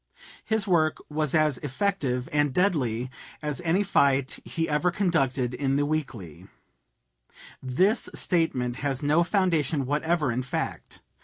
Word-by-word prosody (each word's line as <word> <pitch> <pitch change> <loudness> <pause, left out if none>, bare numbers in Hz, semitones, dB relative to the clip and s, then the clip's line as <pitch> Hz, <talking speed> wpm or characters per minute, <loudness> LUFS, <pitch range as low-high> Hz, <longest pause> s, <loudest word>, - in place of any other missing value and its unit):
His 220 -2 0
work 160 -4 +2
was 155 0 0
as 155 -5 +2
effective 140 -5 -1
and 145 -1 +2
deadly 130 - 0 0.3
as 150 -3 -2
any 175 +4 +1
fight 140 -8 +2
he 165 0 -2
ever 150 +4 +1
conducted 140 -9 0
in 135 +1 0
the 145 +1 +1
Weekly." 130 - -4 1.1
This 185 - +1
statement 130 -9 0
has 140 -1 -2
no 150 +4 +3
foundation 165 -7 +1
whatever 150 0 0
in 120 +2 -1
fact. 130 - -5
150 Hz, 130 wpm, -26 LUFS, 130-170 Hz, 1.1 s, no